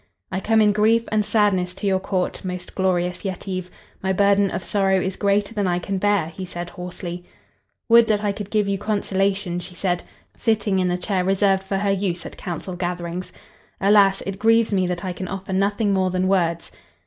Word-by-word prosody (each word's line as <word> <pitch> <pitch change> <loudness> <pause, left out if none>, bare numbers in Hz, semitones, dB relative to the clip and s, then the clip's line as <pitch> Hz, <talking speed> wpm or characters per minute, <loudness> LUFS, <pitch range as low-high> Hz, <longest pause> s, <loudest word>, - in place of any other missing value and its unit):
"I 190 - -1
come 220 +2 +3
in 210 - +5
grief 220 +3 +3
and 215 -1 +2
sadness 195 -4 +1
to 205 - -6
your 190 -1 +2
Court, 185 -1 -2
most 180 -1 -5
glorious 180 -1 0
Yetive. 185 -1 -4 0.3
My 190 - 0
burden 200 +1 +3
of 185 - -4
sorrow 195 -1 +2
is 190 +1 -2
greater 200 +1 +1
than 205 -3 0
I 175 -1 +1
can 190 +2 -3
bear," 205 -3 +2
he 165 +4 -8
said, 175 -1 -6
hoarsely. 180 0 -7 0.6
"Would 235 -1 +6
that 210 -2 +1
I 205 - +1
could 200 0 -6
give 210 -2 +1
you 200 -1 -1
consolation," 195 -3 0
she 180 0 -9
said, 180 -1 -1 0.3
sitting 215 -4 +1
in 185 - +1
the 180 0 0
chair 185 0 -1
reserved 195 0 +2
for 195 0 -2
her 200 0 +1
use 190 -3 -1
at - - -8
council 180 +1 -5
gatherings. 175 0 -4 0.5
"Alas! 200 -1 +4
it 195 0 -5
grieves 225 0 +4
me 185 -2 +2
that 180 0 -3
I 185 - -2
can 185 +1 -6
offer 195 0 -5
nothing 200 +2 +1
more 190 -1 +2
than 185 0 0
words." 170 -3 0
190 Hz, 200 wpm, -22 LUFS, 180-205 Hz, 0.6 s, Would